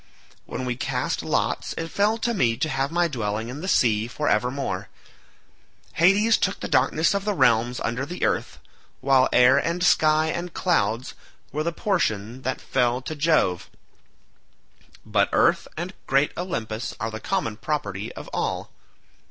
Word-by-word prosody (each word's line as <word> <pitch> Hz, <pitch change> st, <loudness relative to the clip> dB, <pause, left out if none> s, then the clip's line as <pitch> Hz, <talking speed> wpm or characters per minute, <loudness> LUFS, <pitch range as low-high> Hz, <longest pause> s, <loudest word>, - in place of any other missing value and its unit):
When 130 Hz, -, -4 dB
we 125 Hz, -1 st, -2 dB
cast 125 Hz, -, -2 dB
lots, -, -, -1 dB
it 165 Hz, 0 st, -4 dB
fell 210 Hz, +2 st, +2 dB
to 235 Hz, +1 st, -1 dB
me 120 Hz, -, +1 dB
to 155 Hz, +5 st, -1 dB
have 135 Hz, 0 st, -1 dB
my 175 Hz, 0 st, +2 dB
dwelling 110 Hz, -5 st, -3 dB
in 135 Hz, +4 st, -7 dB
the 185 Hz, -, -5 dB
sea 110 Hz, -, +2 dB
for 150 Hz, +5 st, -3 dB
evermore; 120 Hz, -4 st, -1 dB, 1.0 s
Hades 205 Hz, +6 st, +4 dB
took 190 Hz, -, 0 dB
the -, -, -4 dB
darkness 160 Hz, +4 st, +2 dB
of 200 Hz, 0 st, -1 dB
the 210 Hz, 0 st, -1 dB
realms 120 Hz, -3 st, +3 dB
under 120 Hz, +3 st, -2 dB
the 175 Hz, +6 st, -3 dB
earth, -, -, -1 dB, 0.4 s
while 135 Hz, -1 st, +3 dB
air 125 Hz, +2 st, +6 dB
and 170 Hz, +4 st, -1 dB
sky 155 Hz, -2 st, +4 dB
and 170 Hz, +2 st, -4 dB
clouds 120 Hz, -, 0 dB, 0.4 s
were 150 Hz, -, -2 dB
the 170 Hz, +2 st, -1 dB
portion 130 Hz, -, -1 dB
that 130 Hz, 0 st, -2 dB
fell 125 Hz, -1 st, 0 dB
to 155 Hz, -, -5 dB
Jove; 145 Hz, -, +1 dB, 1.4 s
but -, -, +2 dB
earth -, -, +3 dB
and 175 Hz, +3 st, -4 dB
great 135 Hz, +2 st, +2 dB
Olympus 115 Hz, -10 st, -4 dB
are 110 Hz, +1 st, -3 dB
the 110 Hz, -, -6 dB
common 110 Hz, -1 st, -2 dB
property 105 Hz, -6 st, -3 dB
of -, -, -9 dB
all. -, -, -2 dB
135 Hz, 160 wpm, -24 LUFS, 115-170 Hz, 1.4 s, air